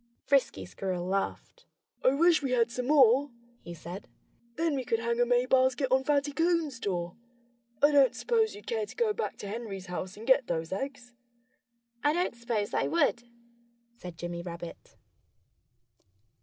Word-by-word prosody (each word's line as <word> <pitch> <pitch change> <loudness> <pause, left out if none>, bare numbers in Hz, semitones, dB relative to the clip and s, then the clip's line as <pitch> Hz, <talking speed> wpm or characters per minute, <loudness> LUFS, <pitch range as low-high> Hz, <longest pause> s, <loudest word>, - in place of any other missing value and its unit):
Frisky 265 - +1
Squirrel 180 - -4
laughed. 195 - -3 0.4
"I 260 - +4
wish 335 +2 +4
we 265 -3 -1
had 235 -1 +2
some 250 +1 -3
more," 275 -1 +5 0.3
he 170 - -9
said. 170 +4 -9 0.5
"Then 330 -1 0
we 265 - -2
could 230 - 0
hang 235 +1 -2
a 245 - +3
May 245 0 +3
basket 260 0 +2
on 265 0 +3
Fatty 290 0 +1
Coon's 325 -4 0
door.... 175 -4 -3 0.7
I 290 - +7
don't 280 -3 +5
suppose 450 -3 +1
you'd 205 - -12
care 220 -2 -2
to 220 - -12
go 450 -3 +1
back 450 - -4
to 205 - -7
Henry's 200 -3 -6
house 180 +2 -6
and 220 - -9
get 260 0 +4
those 165 -1 -3
eggs?" 250 +4 -5 0.9
"I 295 +1 +3
don't 355 +2 0
suppose 235 -3 -2
I - - +1
would," 290 -7 +2 0.7
said 180 -7 -10
Jimmy 175 +1 -5
Rabbit. 170 -1 -9
245 Hz, 165 wpm, -29 LUFS, 195-285 Hz, 0.9 s, I